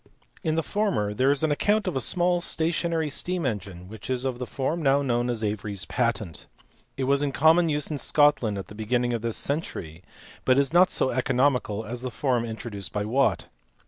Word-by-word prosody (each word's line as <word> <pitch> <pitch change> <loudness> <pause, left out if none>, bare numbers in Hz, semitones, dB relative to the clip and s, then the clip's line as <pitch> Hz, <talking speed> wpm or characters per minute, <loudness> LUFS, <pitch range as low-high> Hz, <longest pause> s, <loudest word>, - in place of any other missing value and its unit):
In 160 -1 0
the 165 - 0
former 190 - 0
there 130 +5 +2
is 145 +1 +1
an 155 - +2
account 210 +8 +1
of 185 - -2
a 130 - 0
small 175 +4 +1
stationary 165 -2 0
steam 180 +3 -2
engine 100 -6 -4
which 110 +3 -10
is 130 0 -1
of 125 -2 -2
the 125 - -4
form 150 +5 -2
now 140 -1 +3
known 120 -2 0
as 115 -2 -2
Avery 105 0 -2
s 90 -5 -3
patent: 110 -5 -2 0.5
it 135 - -1
was 140 +2 +2
in 145 -1 0
common 160 +4 +4
use 150 0 0
in 145 - -2
Scotland 145 -10 +3
at 95 - -5
the - - -12
beginning 120 +3 -1
of 115 - -2
this 115 -1 -2
century, 90 - -4 0.4
but 130 0 +3
is 140 +2 +2
not 180 +1 +6
so 130 - +1
economical 125 -4 +1
as 120 +3 -6
the 130 - -3
form 125 -2 0
introduced 110 -4 -5
by 105 0 -2
Watt. 135 +6 +1
130 Hz, 210 wpm, -26 LUFS, 110-150 Hz, 0.5 s, not